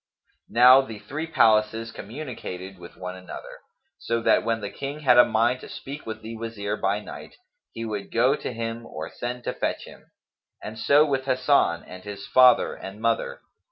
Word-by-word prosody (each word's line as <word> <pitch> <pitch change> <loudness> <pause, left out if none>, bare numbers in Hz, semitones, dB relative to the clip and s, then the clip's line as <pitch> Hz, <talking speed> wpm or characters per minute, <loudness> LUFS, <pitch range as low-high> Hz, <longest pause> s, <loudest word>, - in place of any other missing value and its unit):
Now 125 +3 +7
the 115 -5 -8
three 145 +10 -6
palaces 110 -5 +3
communicated 100 -6 -8
with 85 -1 -12
one 90 0 -6
another, 95 0 -10 0.4
so 115 0 -1
that - - +4
when 115 -1 0
the 100 - -5
King 140 +2 -6
had 125 -4 +5
a - - +10
mind 120 +3 +1
to - - -11
speak 140 0 -8
with 110 0 -6
the 115 +1 -7
Wazir 110 -2 -4
by 100 -1 0
night, 105 - -10 0.4
he 115 - -6
would 105 -3 -5
go 125 +4 +3
to - - -5
him 115 0 -5
or 80 +1 -7
send 120 0 -5
to - - -2
fetch - - -3
him; - - -15 0.5
and 110 +1 -7
so 145 +5 +5
with 135 -3 -1
Hasan 130 -9 +2
and 95 0 -11
his 100 -1 -7
father 125 -1 +5
and 95 +2 -9
mother. 115 0 -1
115 Hz, 185 wpm, -25 LUFS, 105-130 Hz, 0.5 s, a